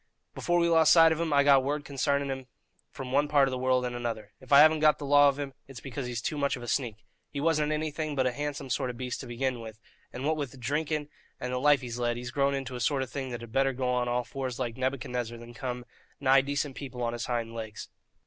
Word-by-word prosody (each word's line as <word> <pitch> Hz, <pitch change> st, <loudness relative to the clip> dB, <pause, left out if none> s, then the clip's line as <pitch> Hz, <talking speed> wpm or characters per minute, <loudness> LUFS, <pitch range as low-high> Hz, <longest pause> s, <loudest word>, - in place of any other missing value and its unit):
Before 175 Hz, 0 st, 0 dB
we 170 Hz, 0 st, +3 dB
lost 160 Hz, -2 st, +6 dB
sight 165 Hz, -1 st, +7 dB
of 160 Hz, +1 st, 0 dB
him, 165 Hz, -2 st, -1 dB
I 140 Hz, -1 st, +5 dB
got 140 Hz, -2 st, +6 dB
word 145 Hz, +2 st, -2 dB
concarning 140 Hz, 0 st, 0 dB
him 130 Hz, -1 st, -6 dB, 0.4 s
from 130 Hz, -2 st, -7 dB
one 145 Hz, +2 st, +3 dB
part 145 Hz, -2 st, +4 dB
of -, -, -2 dB
the 130 Hz, -, -2 dB
world 130 Hz, 0 st, +2 dB
and 120 Hz, 0 st, -3 dB
another. 115 Hz, -3 st, -4 dB
If 130 Hz, -, -16 dB
I 140 Hz, 0 st, +9 dB
haven't 155 Hz, 0 st, +6 dB
got 155 Hz, 0 st, +5 dB
the 145 Hz, -, -6 dB
law 145 Hz, 0 st, +6 dB
of 140 Hz, -, -3 dB
him, 140 Hz, -2 st, -5 dB
it's 135 Hz, -3 st, -9 dB
because 130 Hz, 0 st, -5 dB
he's 120 Hz, -2 st, -4 dB
too 150 Hz, -, -2 dB
much 140 Hz, 0 st, +1 dB
of 120 Hz, -, -9 dB
a -, -, -7 dB
sneak. 115 Hz, -5 st, -2 dB, 0.2 s
He 140 Hz, -, -5 dB
wasn't 155 Hz, 0 st, +1 dB
anything 155 Hz, 0 st, -2 dB
but 130 Hz, -2 st, +1 dB
a 130 Hz, -, +2 dB
handsome 145 Hz, 0 st, -4 dB
sort 125 Hz, -, 0 dB
of 120 Hz, -, -6 dB
beast 125 Hz, 0 st, -4 dB
to -, -, -7 dB
begin 125 Hz, +1 st, -2 dB
with; 110 Hz, -1 st, -9 dB, 0.3 s
and, 130 Hz, +2 st, -5 dB
what 155 Hz, +1 st, +1 dB
with 135 Hz, -3 st, -5 dB
drinking 150 Hz, +3 st, -2 dB, 0.3 s
and 125 Hz, 0 st, -4 dB
the 125 Hz, -, 0 dB
life 145 Hz, 0 st, +4 dB
he's 120 Hz, -1 st, -5 dB
led, 120 Hz, -1 st, 0 dB
he's 120 Hz, 0 st, -6 dB
grown 140 Hz, 0 st, +1 dB
into 135 Hz, -2 st, -4 dB
a -, -, -4 dB
sort 135 Hz, +2 st, +1 dB
of 130 Hz, -, -9 dB
thing 135 Hz, -2 st, -4 dB
that 120 Hz, -2 st, -5 dB
had 115 Hz, -1 st, -10 dB
better 135 Hz, +2 st, +2 dB
go 130 Hz, 0 st, -2 dB
on 125 Hz, -1 st, +1 dB
all 120 Hz, 0 st, 0 dB
fours 130 Hz, -2 st, -5 dB
like 120 Hz, -3 st, -3 dB
Nebuchadnezzar 125 Hz, -2 st, -3 dB
than 120 Hz, +1 st, -11 dB
come 125 Hz, -1 st, -5 dB, 0.3 s
nigh 135 Hz, -1 st, +5 dB
decent 140 Hz, 0 st, -2 dB
people 130 Hz, -3 st, -6 dB
on 120 Hz, 0 st, -1 dB
his 120 Hz, 0 st, -4 dB
hind 115 Hz, -2 st, -2 dB
legs. 110 Hz, -2 st, -7 dB
135 Hz, 265 wpm, -29 LUFS, 125-145 Hz, 0.4 s, I